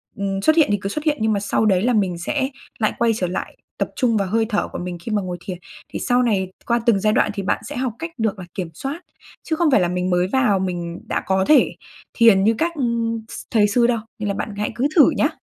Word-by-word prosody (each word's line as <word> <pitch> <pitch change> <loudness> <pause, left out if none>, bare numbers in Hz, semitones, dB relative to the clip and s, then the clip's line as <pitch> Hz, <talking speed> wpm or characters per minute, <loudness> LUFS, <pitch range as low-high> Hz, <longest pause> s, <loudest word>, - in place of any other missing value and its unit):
ừm, 195 -1 -2
xuất 315 +10 +4
hiện 320 -3 +5
thì 205 - +2
cứ 195 - -3
xuất 300 +8 -4
hiện, 300 -1 +2
nhưng 220 0 +2
mà 200 - 0
sau 205 +2 0
đấy 190 -4 +3
là 245 +4 +2
mình 190 -5 +1
sẽ 265 - -1 0.3
lại 215 -2 +1
quay 235 -1 +3
trở 185 -4 -1
lại 180 - -5 0.2
tập - - -1
trung 235 -4 +2
vào 200 -2 0
hơi 225 +4 +1
thở 210 - 0
của - - -7
mình 180 0 -5
khi 230 - -5
mà 210 -1 +1
ngồi 180 -2 -5
thiền. 185 -2 -5 0.3
Thì - - -5
sau 250 0 +2
này 195 -6 0 0.2
qua 235 0 +2
từng 230 -5 +4
giai 215 +2 +2
đoạn 215 - +2
thì 200 -1 -4
bạn - - 0
sẽ - - -6
học 250 -2 -1
cách 335 0 -5
được 220 -3 -1
là 185 - -7
kiểm 180 -3 -4
soát, 275 - -5 0.4
chứ 320 - -1
không 315 -2 +2
phải 235 - +5
là 175 - +2
mình 180 +1 -1
mới 180 0 +2
vào 215 -3 +2
mình 175 -2 -3
đã - - -1
có 190 0 +1
thể 305 - +4 0.4
thiền 225 -5 +5
như 225 +3 +3
các 335 +5 +1 0.6
s - - -7
thầy 210 -3 +4
sư 235 +3 +3
đâu, 240 -2 +1 0.2
nên 210 - -2
là - - 0
bạn 200 +1 -4
hãy 210 - -1
cứ 250 +4 +1
thử 310 - +7
nhá. - - +3
210 Hz, 270 wpm, -21 LUFS, 190-245 Hz, 0.6 s, thử